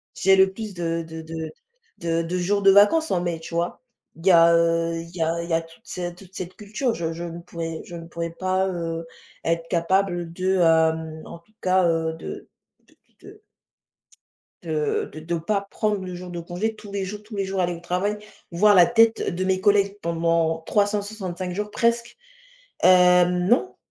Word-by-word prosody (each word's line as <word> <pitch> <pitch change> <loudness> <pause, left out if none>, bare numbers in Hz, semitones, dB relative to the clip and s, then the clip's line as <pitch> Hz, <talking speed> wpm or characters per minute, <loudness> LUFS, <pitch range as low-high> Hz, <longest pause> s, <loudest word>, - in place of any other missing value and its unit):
j'ai 190 +1 +4
le 190 0 +5
plus 215 -2 -7
de 165 -1 -2
de 160 0 -8 0.8
de 165 0 0
de 175 +2 -3
jours 200 +3 0
de 195 - +6
vacances 210 +12 +5
en 175 - +1
mai, 170 -2 -2
tu 165 +1 -8
vois? 170 +6 -2 0.3
Il 165 +4 -7
y - - +8
a, 170 0 +7
heu, 165 0 +2
il 170 +2 -12
y 165 - 0
a 165 +1 -1
il 170 - -7
y - - -1
a 165 - +3
toute 165 0 -17
cette 175 -1 -5
toute 190 -1 -16
cette 185 0 -6
culture, 215 +4 -2
je 165 -4 -3
je 170 +1 -6
ne 170 0 -6
pourrais 165 -1 -6
je 175 - -9
ne 165 - -8
pourrais 170 0 -4
pas, 185 +2 0
heu, 165 -2 -4 0.4
être 165 0 -1
capable 175 0 0
de, 185 +2 0
hem, 160 -1 +2
en 170 - -10
tout 215 +6 -32
cas, 185 -1 +3
heu, 165 -1 0
de - - -8 0.4
d - - -27 0.3
de - - -14 1.2
de 155 -3 -1
de 155 - -7
de 170 +2 -3
pas 200 +4 -2
prendre 210 -3 -1
le 180 -1 -6
jour 180 0 -8
de 175 - -5
congé, 180 +6 -3
tous 210 -1 -12
les 200 -1 -2
jours 210 +2 -7
tous 215 0 -10
les 195 -1 -1
jours, 190 0 -3
aller 175 0 0
au 170 - -8
travail, 185 +4 -1 0.3
voire 205 +5 +5
la 180 -2 +8
tête 225 0 +3
de 185 - -1
mes 185 0 +1
collègues 200 -1 +3
pendant 165 -1 0
365 200 -3 -1
jours 210 +3 -3
presque. 235 0 0 0.7
Hem, 180 -1 +5
non, 245 - +2
180 Hz, 200 wpm, -24 LUFS, 165-195 Hz, 1.2 s, y